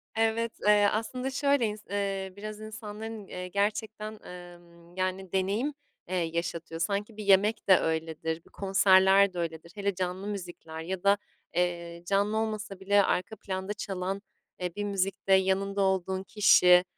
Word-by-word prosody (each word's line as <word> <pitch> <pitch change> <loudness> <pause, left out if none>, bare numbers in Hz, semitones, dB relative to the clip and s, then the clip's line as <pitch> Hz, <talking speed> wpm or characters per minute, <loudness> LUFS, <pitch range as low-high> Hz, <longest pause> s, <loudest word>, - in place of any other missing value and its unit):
Evet, 225 +1 +1
eee, 205 -1 +6
aslında 250 +4 -2
şöyle 280 -2 +2
ins 210 0 -4
eee, 195 -1 -2
biraz 210 +1 -7
insanların, 215 -1 -7
eee, 180 0 -6
gerçekten, 215 +2 -2
emm, 175 -1 -13
yani 185 0 -2
deneyim, 200 +10 0 0.4
eee, 185 - -1
yaşatıyor. 165 -1 -3
Sanki 205 +2 -2
bir 215 - -5
yemek 205 +3 +4
de 185 - +9
öyledir, 160 0 -2
bir - - -19
konserler 195 0 +5
de 175 - -4
öyledir. 165 0 -4
Hele 200 -1 -1
canlı 185 +2 -3
müzikler 175 -5 -6
ya 180 +2 -4
da, 200 +1 +5 0.4
eee, 170 -1 -1
canlı 200 +3 +1
olmasa 215 -3 -3
bile 200 +1 +4
arka 190 +3 -1
planda 190 0 -4
çalan, 195 -1 -3 0.4
eee, 180 -2 -3
bir 205 - -2
müzikte 195 -1 0
yanında 190 +1 +2
olduğun 190 -1 0
kişi, 180 -3 +6
195 Hz, 150 wpm, -29 LUFS, 180-210 Hz, 0.4 s, de